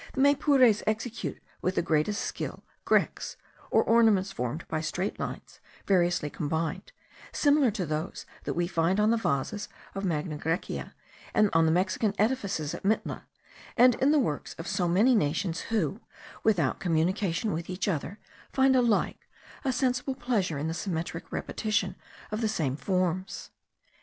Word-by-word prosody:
The 265 Hz, -, 0 dB
Maypures 275 Hz, -5 st, +5 dB
execute 220 Hz, +2 st, -3 dB, 0.2 s
with 185 Hz, -, 0 dB
the -, -, +1 dB
greatest 165 Hz, +6 st, +1 dB
skill -, -, -5 dB, 0.2 s
grecques, -, -, +1 dB, 0.3 s
or -, -, +4 dB
ornaments 220 Hz, -4 st, +4 dB
formed 140 Hz, -1 st, -4 dB
by 155 Hz, -1 st, -2 dB
straight 175 Hz, +5 st, -3 dB
lines -, -, -6 dB, 0.3 s
variously 175 Hz, -5 st, +2 dB
combined, 160 Hz, -, -3 dB, 0.4 s
similar 290 Hz, -3 st, +4 dB
to 195 Hz, -4 st, -2 dB
those 155 Hz, +2 st, -4 dB, 0.2 s
that -, -, -2 dB
we 175 Hz, 0 st, +1 dB
find 175 Hz, +2 st, +1 dB
on 210 Hz, +1 st, +4 dB
the 230 Hz, -, +3 dB
vases 205 Hz, +3 st, -1 dB, 0.2 s
of 195 Hz, -, -4 dB
Magna 155 Hz, -3 st, -2 dB
Grecia, 165 Hz, +5 st, -3 dB, 0.4 s
on 180 Hz, -6 st, +4 dB
the -, -, +3 dB
Mexican 190 Hz, +4 st, +1 dB
edifices 200 Hz, -, 0 dB
at -, -, -6 dB
Mitla, 215 Hz, +3 st, -1 dB, 0.5 s
and 250 Hz, +1 st, +7 dB
in 265 Hz, +4 st, +2 dB
the 305 Hz, -, +4 dB
works 195 Hz, -, -1 dB
of 165 Hz, -, -7 dB
so 190 Hz, -2 st, 0 dB
many 205 Hz, +9 st, +4 dB
nations 165 Hz, -1 st, 0 dB
who, 210 Hz, -, 0 dB, 0.4 s
without 175 Hz, -12 st, +2 dB
communication 185 Hz, +4 st, 0 dB
with 165 Hz, +2 st, -4 dB
each 185 Hz, +2 st, -2 dB
other, 180 Hz, +2 st, -2 dB, 0.3 s
find 265 Hz, 0 st, +4 dB
alike 240 Hz, -4 st, +1 dB, 0.3 s
a 270 Hz, -, +1 dB
sensible 255 Hz, +1 st, 0 dB
pleasure 225 Hz, -, 0 dB
in 145 Hz, +3 st, -2 dB
the 160 Hz, -, -2 dB
symmetric 165 Hz, -2 st, -4 dB
repetition 205 Hz, -4 st, -1 dB, 0.4 s
of 215 Hz, +2 st, -2 dB
the 220 Hz, -, +1 dB
same 150 Hz, -10 st, -1 dB
forms. 185 Hz, +2 st, -2 dB
190 Hz, 150 wpm, -28 LUFS, 165-225 Hz, 0.5 s, and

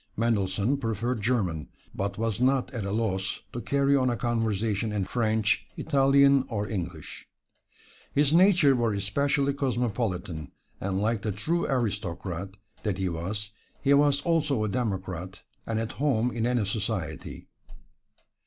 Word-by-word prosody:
Mendelssohn 105 Hz, +2 st, +1 dB
preferred 115 Hz, -1 st, -2 dB
German, 100 Hz, -10 st, 0 dB, 0.2 s
but 100 Hz, +1 st, -3 dB
was 115 Hz, 0 st, -1 dB
not 130 Hz, 0 st, +2 dB
at 115 Hz, -5 st, -3 dB
a 100 Hz, -, -2 dB
loss 95 Hz, -3 st, -1 dB
to 120 Hz, -, -4 dB
carry 140 Hz, +1 st, +2 dB
on 130 Hz, -2 st, +3 dB
a 120 Hz, -, -1 dB
conversation 110 Hz, -2 st, 0 dB
in 100 Hz, -2 st, -1 dB
French, 110 Hz, -2 st, +1 dB
Italian 140 Hz, -2 st, +4 dB
or 105 Hz, -3 st, -2 dB
English. 90 Hz, -7 st, -5 dB, 0.8 s
His 145 Hz, +1 st, +3 dB
nature 175 Hz, -6 st, +6 dB
was 115 Hz, -4 st, +1 dB
especially 140 Hz, +7 st, +1 dB
cosmopolitan, 115 Hz, -, -2 dB, 0.3 s
and 95 Hz, 0 st, -2 dB
like 110 Hz, +1 st, 0 dB
the 110 Hz, -, -1 dB
true 160 Hz, -, -1 dB
aristocrat 100 Hz, -, -2 dB, 0.3 s
that 105 Hz, -4 st, -1 dB
he 95 Hz, -1 st, 0 dB
was, 100 Hz, +5 st, -3 dB, 0.3 s
he 140 Hz, -, +5 dB
was 140 Hz, 0 st, +4 dB
also 150 Hz, -8 st, +1 dB
a 110 Hz, -, 0 dB
democrat, 95 Hz, -5 st, -3 dB, 0.2 s
and 115 Hz, -, -1 dB
at 115 Hz, 0 st, -3 dB
home 125 Hz, -4 st, +1 dB
in 115 Hz, -1 st, -1 dB
any 120 Hz, -4 st, +1 dB
society. 100 Hz, -4 st, -3 dB
115 Hz, 140 wpm, -27 LUFS, 100-135 Hz, 0.8 s, nature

